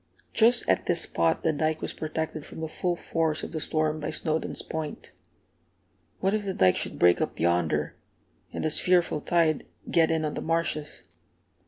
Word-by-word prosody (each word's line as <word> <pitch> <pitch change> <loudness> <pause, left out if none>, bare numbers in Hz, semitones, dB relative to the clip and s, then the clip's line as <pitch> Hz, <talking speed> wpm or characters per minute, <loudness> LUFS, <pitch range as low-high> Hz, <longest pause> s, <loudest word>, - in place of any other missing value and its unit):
Just 235 +2 +5
at - - +1
this 175 -1 +3
spot 85 -1 +1
the 160 - +2
dike 155 +1 0
was - - -4
protected 155 0 -4
from - - -10
the 160 - -2
full 175 +2 -1
force 160 -2 -1
of - - -5
the 160 - -3
storm 155 0 -1
by 150 - -3
Snowdons' 160 -1 -1
Point. 160 -2 -5 1.1
"What 195 +1 +2
if 215 -1 0
the 195 -2 -3
dike 90 -1 +4
should - - -3
break 90 0 +4
up - - -3
yonder, 80 -3 +1 0.6
and - - -4
this 155 - +1
fearful 175 -4 +2
tide 165 -3 +1 0.2
get 165 -1 +4
in 160 -1 0
on 150 - -2
the - - -4
marshes?" 165 -2 -1
155 Hz, 180 wpm, -27 LUFS, 150-165 Hz, 1.1 s, Just